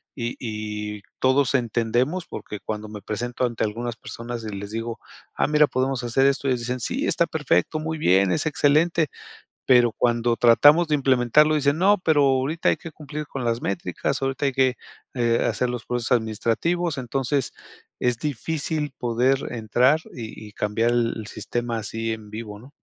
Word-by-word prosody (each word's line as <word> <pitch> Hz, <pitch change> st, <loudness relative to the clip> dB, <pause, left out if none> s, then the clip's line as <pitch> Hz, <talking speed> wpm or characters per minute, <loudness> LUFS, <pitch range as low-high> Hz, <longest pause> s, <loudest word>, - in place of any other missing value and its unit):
y 120 Hz, -2 st, -3 dB
y 105 Hz, -2 st, -5 dB, 0.2 s
todos 130 Hz, +1 st, +3 dB
entendemos 120 Hz, -, 0 dB
porque 105 Hz, -, -7 dB
cuando 110 Hz, 0 st, -5 dB
me 105 Hz, -1 st, -8 dB
presento 120 Hz, +5 st, -2 dB
ante 120 Hz, -2 st, -2 dB
algunas 115 Hz, +2 st, -4 dB
personas 115 Hz, 0 st, -7 dB
y 110 Hz, -, -4 dB
les 100 Hz, +1 st, -6 dB
digo: 115 Hz, +1 st, -4 dB, 0.4 s
"Ah -, -, +1 dB
mira, 150 Hz, 0 st, +4 dB
podemos 130 Hz, -1 st, -1 dB
hacer 120 Hz, +3 st, +2 dB
esto" 140 Hz, 0 st, 0 dB
y -, -, +2 dB
ellos 125 Hz, -2 st, 0 dB
dicen: 125 Hz, +2 st, -3 dB
"Sí, 270 Hz, -, -2 dB
está 170 Hz, -, +2 dB
perfecto, 150 Hz, -, 0 dB
muy 160 Hz, +1 st, -3 dB
bien, 95 Hz, -, +3 dB
es -, -, 0 dB
excelente". 155 Hz, +2 st, +2 dB, 0.6 s
Pero 120 Hz, -2 st, +5 dB
cuando 120 Hz, -1 st, +1 dB
tratamos 145 Hz, +8 st, +6 dB
de 150 Hz, -, +3 dB
implementarlo, 135 Hz, +3 st, +3 dB
dicen: 145 Hz, +1 st, +2 dB
"No, 200 Hz, +3 st, +5 dB
pero 155 Hz, -5 st, +3 dB
ahorita 135 Hz, +4 st, +2 dB
hay -, -, +1 dB
que 165 Hz, -, -9 dB
cumplir 150 Hz, 0 st, -7 dB
con 130 Hz, -2 st, -5 dB
las 115 Hz, +1 st, 0 dB
métricas, 160 Hz, -4 st, -2 dB
ahorita 135 Hz, +1 st, -1 dB
hay 135 Hz, -, +1 dB
que, 130 Hz, -1 st, +2 dB, 0.4 s
eh, 120 Hz, -1 st, +2 dB
hacer 125 Hz, -, -1 dB
los 120 Hz, -2 st, -5 dB
procesos 120 Hz, +1 st, -1 dB
administrativos", 120 Hz, +10 st, -1 dB
entonces 130 Hz, +1 st, -1 dB, 0.5 s
es 125 Hz, -1 st, +1 dB
difícil 150 Hz, +2 st, -2 dB
poder 125 Hz, +3 st, +2 dB
entrar 125 Hz, +6 st, +2 dB
y 110 Hz, -2 st, -8 dB
y -, -, -19 dB
cambiar 110 Hz, +3 st, 0 dB
el 120 Hz, -1 st, +1 dB
el 110 Hz, -2 st, -7 dB
sistema 120 Hz, -1 st, -3 dB
así 115 Hz, +1 st, -3 dB
en 110 Hz, -1 st, -9 dB
vivo, 105 Hz, -2 st, -7 dB
¿no? 130 Hz, +5 st, -15 dB
125 Hz, 175 wpm, -24 LUFS, 115-145 Hz, 0.6 s, tratamos